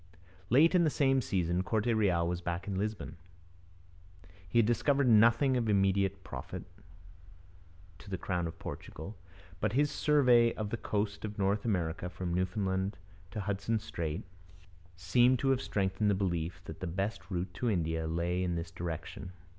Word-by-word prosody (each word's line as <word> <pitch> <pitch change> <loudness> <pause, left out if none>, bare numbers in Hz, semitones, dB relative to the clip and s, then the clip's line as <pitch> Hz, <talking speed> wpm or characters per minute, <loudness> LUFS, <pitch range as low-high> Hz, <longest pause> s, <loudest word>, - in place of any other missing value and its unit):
Late 150 +9 +6
in 180 -2 +5
the 160 - +4
same 135 -2 +2
season, 90 -4 0
Corte 110 +4 0
Real 90 -6 +2
was 90 0 -2
back 85 +2 -3
in 100 - -2
Lisbon. 105 -3 -3 1.3
He 120 - 0
had 115 - +6
discovered 135 +4 +2
nothing 120 +4 +5
of 115 -3 0
immediate 95 -1 +2
profit - - -7 1.4
to 100 - -12
the 95 - -2
crown 90 -2 -2
of 80 - -8
Portugal, 95 +8 -7 0.4
but 105 +2 0
his 145 +3 +2
survey 125 -6 +4
of 110 -1 -4
the 115 - -1
coast 105 -1 -2
of 105 -1 -5
North 100 +2 +1
America 90 -4 -1
from 90 -1 -4
Newfoundland 95 +2 -1 0.3
to 105 - -4
Hudson 100 +3 -1
Strait 85 -4 -4 0.7
seems 120 +9 +3
to 135 +3 0
have 135 -1 +1
strengthened 95 +1 0
the 100 - +3
belief 85 -3 -2
that 80 - -8
the 90 - -4
best 95 +7 -3
route 90 -1 -3
to 115 +5 -1
India 80 -4 0
lay 85 +2 -1
in 90 -1 -1
this 85 +1 -4
direction. 85 +1 -6
100 Hz, 160 wpm, -32 LUFS, 90-115 Hz, 1.4 s, Late